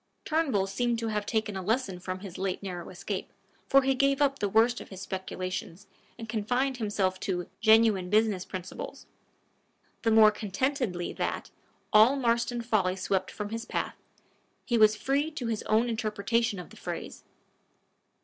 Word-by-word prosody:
Turnbull 300 Hz, -11 st, +1 dB
seemed 235 Hz, +4 st, 0 dB
to 230 Hz, -1 st, -2 dB
hare 210 Hz, -1 st, 0 dB
taken 215 Hz, 0 st, -2 dB
a 190 Hz, -, -3 dB
lesson 205 Hz, -2 st, -1 dB
from 185 Hz, +1 st, -5 dB
his 190 Hz, -3 st, -8 dB
late 190 Hz, 0 st, -2 dB
narrow 180 Hz, -3 st, -5 dB
escape, 185 Hz, +2 st, -5 dB, 0.4 s
for 275 Hz, +5 st, +5 dB
he 270 Hz, 0 st, +3 dB
gave 275 Hz, +1 st, +2 dB
up 280 Hz, -1 st, +2 dB
the 205 Hz, -, 0 dB
worst 225 Hz, +4 st, +3 dB
of -, -, -11 dB
his 190 Hz, -, -9 dB
speculations, 185 Hz, -1 st, -5 dB, 0.3 s
and 225 Hz, -1 st, -7 dB
confined 245 Hz, +5 st, 0 dB
himself 200 Hz, -4 st, 0 dB
to 180 Hz, -3 st, -2 dB
"genuine 220 Hz, -4 st, +4 dB
business 210 Hz, -3 st, +2 dB
principles" 185 Hz, -1 st, -7 dB, 1.0 s
the 225 Hz, -, +2 dB
more 220 Hz, -1 st, +7 dB
contentedly 210 Hz, -2 st, -2 dB
that, -, -, -3 dB, 0.4 s
all 220 Hz, +6 st, +7 dB
Marston 235 Hz, -2 st, 0 dB
folly 195 Hz, -6 st, +1 dB
swept 190 Hz, 0 st, -1 dB
from 210 Hz, -1 st, -5 dB
his 225 Hz, +1 st, -4 dB
path, -, -, -3 dB, 0.7 s
he 240 Hz, -, 0 dB
was 215 Hz, -1 st, +6 dB
free 275 Hz, +7 st, 0 dB
to 300 Hz, -6 st, -6 dB
his 225 Hz, -2 st, -1 dB
own 220 Hz, +3 st, +3 dB
interpretation 220 Hz, -1 st, 0 dB
of 180 Hz, -, -9 dB
the -, -, -14 dB
phrase. -, -, -6 dB
215 Hz, 160 wpm, -29 LUFS, 190-240 Hz, 1.0 s, more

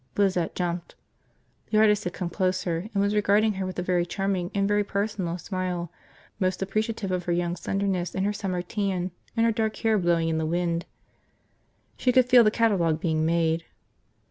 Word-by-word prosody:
Lizette 185 Hz, -4 st, +1 dB
jumped. 175 Hz, -1 st, -3 dB, 0.7 s
The 215 Hz, -, +1 dB
artist 210 Hz, -1 st, +4 dB
had 180 Hz, -, -2 dB
come 180 Hz, -3 st, -4 dB
closer 185 Hz, 0 st, -1 dB
and 200 Hz, -1 st, +1 dB
was 200 Hz, +1 st, +1 dB
regarding 210 Hz, +1 st, +3 dB
her 190 Hz, -1 st, -3 dB
with 185 Hz, -, -6 dB
a 180 Hz, -, -1 dB
very 180 Hz, -1 st, +1 dB
charming 185 Hz, 0 st, -2 dB
and 195 Hz, 0 st, +2 dB
very 205 Hz, 0 st, +2 dB
personal 200 Hz, -4 st, -2 dB
smile, 180 Hz, -2 st, -3 dB, 0.5 s
most 185 Hz, -1 st, 0 dB
appreciative 215 Hz, 0 st, -2 dB
of 180 Hz, -1 st, -2 dB
her 175 Hz, -, -1 dB
young 175 Hz, 0 st, 0 dB
slenderness 190 Hz, 0 st, -2 dB
and 190 Hz, 0 st, 0 dB
her 205 Hz, -, 0 dB
summer 185 Hz, -4 st, -3 dB
tan 185 Hz, -2 st, -2 dB, 0.3 s
and 230 Hz, -, +4 dB
her 230 Hz, -, +4 dB
dark 220 Hz, -1 st, -1 dB
hair 220 Hz, -2 st, +2 dB
blowing 170 Hz, -2 st, +2 dB
in 160 Hz, -1 st, 0 dB
the 160 Hz, -, -1 dB
wind. 170 Hz, 0 st, -1 dB, 1.1 s
She 255 Hz, -, +2 dB
could 255 Hz, 0 st, +5 dB
feel 250 Hz, -2 st, +7 dB
the 215 Hz, -, +5 dB
catalogue 195 Hz, -9 st, +2 dB
being 160 Hz, -2 st, 0 dB
made. 165 Hz, 0 st, +1 dB
185 Hz, 185 wpm, -26 LUFS, 175-205 Hz, 1.1 s, feel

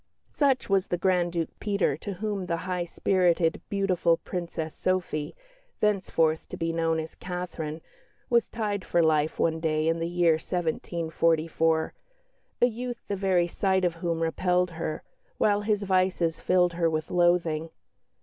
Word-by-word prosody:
Such 275 Hz, -3 st, +2 dB
was 195 Hz, -1 st, +2 dB
the 175 Hz, -, -1 dB
Grand 180 Hz, -1 st, +2 dB
Duke 165 Hz, -2 st, -2 dB
Peter, 200 Hz, -8 st, +1 dB
to 200 Hz, +5 st, -5 dB
whom 200 Hz, -1 st, -3 dB
the 170 Hz, -1 st, 0 dB
high 180 Hz, -1 st, -1 dB
spirited, 175 Hz, -2 st, +1 dB
beautiful 185 Hz, -4 st, +2 dB
Princess 170 Hz, -3 st, -5 dB
Sophie 175 Hz, -5 st, -2 dB, 0.4 s
(thenceforth 175 Hz, -6 st, +1 dB
to -, -, -6 dB
be 165 Hz, 0 st, -1 dB
known 165 Hz, -1 st, +1 dB
as 160 Hz, 0 st, -6 dB
"Catherine") 170 Hz, -3 st, -5 dB, 0.5 s
was 235 Hz, -1 st, +2 dB
tied 205 Hz, -4 st, -2 dB
for 170 Hz, -2 st, +2 dB
life 155 Hz, -1 st, +2 dB
one 160 Hz, -1 st, +1 dB
day 155 Hz, -1 st, 0 dB
in 165 Hz, 0 st, +1 dB
the 165 Hz, -, -1 dB
year 175 Hz, -2 st, +3 dB
1744 165 Hz, -1 st, 0 dB, 0.7 s
a -, -, +10 dB
youth 245 Hz, 0 st, -4 dB
the 200 Hz, -, -1 dB
very 185 Hz, -3 st, +2 dB
sight 190 Hz, +1 st, +1 dB
of 175 Hz, -, +1 dB
whom 170 Hz, -2 st, -1 dB
repelled 180 Hz, +2 st, +1 dB
her, 165 Hz, -2 st, -4 dB, 0.3 s
while 205 Hz, -1 st, +2 dB
his 210 Hz, -1 st, 0 dB
vices 185 Hz, -3 st, +1 dB
filled 180 Hz, -1 st, +2 dB
her 170 Hz, -1 st, +1 dB
with 155 Hz, -1 st, -3 dB
loathing. 175 Hz, -2 st, +2 dB
175 Hz, 150 wpm, -27 LUFS, 165-190 Hz, 0.7 s, a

